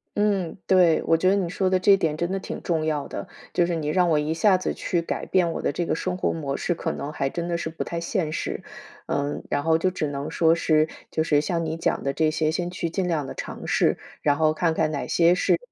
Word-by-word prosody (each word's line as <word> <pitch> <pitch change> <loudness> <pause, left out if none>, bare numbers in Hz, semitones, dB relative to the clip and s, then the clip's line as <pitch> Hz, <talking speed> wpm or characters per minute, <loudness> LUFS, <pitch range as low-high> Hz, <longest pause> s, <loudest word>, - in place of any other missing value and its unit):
嗯， 200 -5 0
对， 180 -4 +4
我 165 - +3
觉 185 +3 +3
得 195 - +4
你 190 -4 0
说 190 +1 0
的 185 0 +2
这 195 +2 +6
点 160 -5 -1
真 170 +2 -1
的 195 - -1
挺 - - -6
重 165 -3 0
要 150 -2 -1
的。 - - -6 0.3
就 175 - +3
是 175 0 -1
你 155 -2 -3
让 180 +2 +3
我 155 - +3
一 150 +1 0
下 190 +3 +4
子 185 - -2
去 175 - -1
改 - - -3
变 180 -3 +2
我 - - -4
的 - - 0
这 170 +3 -2
个 - - 0
生 180 +2 -2
活 - - 0
模 140 -4 -3
式， 175 - 0
可 165 0 -3
能 150 0 -5
还 135 -3 -1
真 170 +4 -4
的 170 - -1
是 165 - -3
不 160 - -4
太 170 - -4
现 170 -3 -1
实。 - - -3 0.4
嗯， 145 +1 -2
然 145 - 0
后 160 0 +3
就 185 +3 +1
只 155 -4 -2
能 140 0 -4
说 165 -1 +4
是 155 -2 +2 0.2
就 160 - +1
是 145 -2 +3
像 165 +2 -1
你 160 0 -3
讲 - - -1
的 140 - 0
这 155 +2 +1
些， 155 0 +1
先 175 +2 -2
去 170 -1 -3
尽 185 +2 -1
量 155 -5 -1
地 - - -7
尝 - - -7
试， - - +2 0.2
然 145 -1 +3
后 155 -1 +3
看 160 +1 +1
看 155 - +1
哪 145 - -3
些 170 +1 +4
是 - - +2
165 Hz, 285 characters per minute, -24 LUFS, 155-180 Hz, 0.4 s, 这